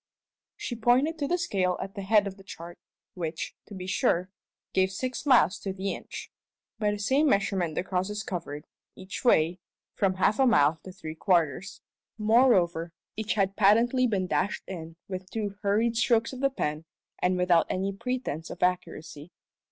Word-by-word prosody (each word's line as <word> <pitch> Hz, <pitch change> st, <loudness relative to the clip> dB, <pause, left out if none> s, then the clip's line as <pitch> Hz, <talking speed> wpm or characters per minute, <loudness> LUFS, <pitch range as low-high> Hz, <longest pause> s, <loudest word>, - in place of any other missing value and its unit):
She 240 Hz, -, -4 dB
pointed 255 Hz, +8 st, +2 dB
to 285 Hz, -, 0 dB
the 355 Hz, -, +1 dB
scale 190 Hz, -, 0 dB
at 195 Hz, -, -5 dB
the 200 Hz, -, -6 dB
head 205 Hz, +1 st, +4 dB
of 195 Hz, -1 st, -5 dB
the 195 Hz, -, -16 dB
chart, 175 Hz, -2 st, -10 dB, 0.3 s
which, 165 Hz, -2 st, -4 dB
to 205 Hz, -, -9 dB
be 185 Hz, -1 st, -6 dB
sure, 185 Hz, -1 st, +1 dB, 0.4 s
gave 190 Hz, 0 st, +2 dB
six 255 Hz, +8 st, -4 dB
miles 200 Hz, -, +5 dB
to 195 Hz, -, -4 dB
the 195 Hz, +1 st, -2 dB
inch. -, -, -8 dB, 0.5 s
By 210 Hz, -2 st, +2 dB
the 205 Hz, -, -1 dB
same 265 Hz, +9 st, +2 dB
measurement 190 Hz, -6 st, +1 dB
the -, -, 0 dB
crosses 195 Hz, +3 st, -2 dB
covered, 155 Hz, -5 st, -5 dB, 0.3 s
each 190 Hz, +1 st, -7 dB
way, 175 Hz, -7 st, +3 dB, 0.3 s
from 190 Hz, -2 st, +1 dB
half 200 Hz, +4 st, +2 dB
a 265 Hz, -, +5 dB
mile 155 Hz, -7 st, +4 dB
to 190 Hz, -, -7 dB
three 155 Hz, -3 st, -7 dB
quarters. 175 Hz, +1 st, 0 dB, 0.4 s
Moreover, 210 Hz, -7 st, +3 dB, 0.2 s
each 215 Hz, 0 st, -2 dB
had 195 Hz, -1 st, +1 dB
patently 235 Hz, +5 st, +4 dB
been 195 Hz, -5 st, 0 dB
dashed 195 Hz, +2 st, -1 dB
in 165 Hz, -3 st, -7 dB
with 185 Hz, -1 st, -6 dB
two 205 Hz, -3 st, -4 dB
hurried 220 Hz, +3 st, +2 dB
strokes 230 Hz, 0 st, +2 dB
of 255 Hz, -, -7 dB
the 275 Hz, +1 st, +3 dB
pen 155 Hz, -, -3 dB, 0.3 s
and 180 Hz, 0 st, +1 dB
without 180 Hz, -2 st, +3 dB
any 195 Hz, +1 st, -1 dB
pretence 220 Hz, -, -3 dB
of 175 Hz, -, -5 dB
accuracy. 165 Hz, -3 st, -2 dB
195 Hz, 175 wpm, -28 LUFS, 180-225 Hz, 0.5 s, miles